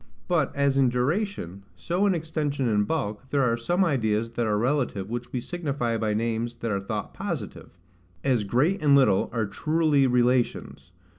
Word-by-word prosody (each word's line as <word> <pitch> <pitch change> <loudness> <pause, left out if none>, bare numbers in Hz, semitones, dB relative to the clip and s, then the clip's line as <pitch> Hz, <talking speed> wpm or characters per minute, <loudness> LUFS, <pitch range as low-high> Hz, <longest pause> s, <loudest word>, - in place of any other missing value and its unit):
But 175 -5 +1
as 140 -1 +2
in 135 -2 +4
duration, 125 - -2
so 175 - 0
in 190 - +2
extension 150 -4 -2
and 105 -2 +1
bulk, 130 -5 -3
there 140 -1 +2
are 115 -2 +2
some 175 +11 +1
ideas 115 -7 0
that 115 -1 -1
are 105 -1 +1
relative 120 -5 -1
which 120 0 -5
we 125 - -2
signify 140 -5 -2
by 110 -1 -1
names 115 +1 -2
that 115 - -2
are 100 - 0
thought 100 - -5
positive; - - -6 0.5
as 125 -6 +2
GREAT 140 - +1
and 145 -2 +5
LITTLE 130 -9 +3
are 115 -3 -1
truly 150 +5 +2
relations. 125 -6 0
125 Hz, 170 wpm, -26 LUFS, 115-150 Hz, 0.5 s, and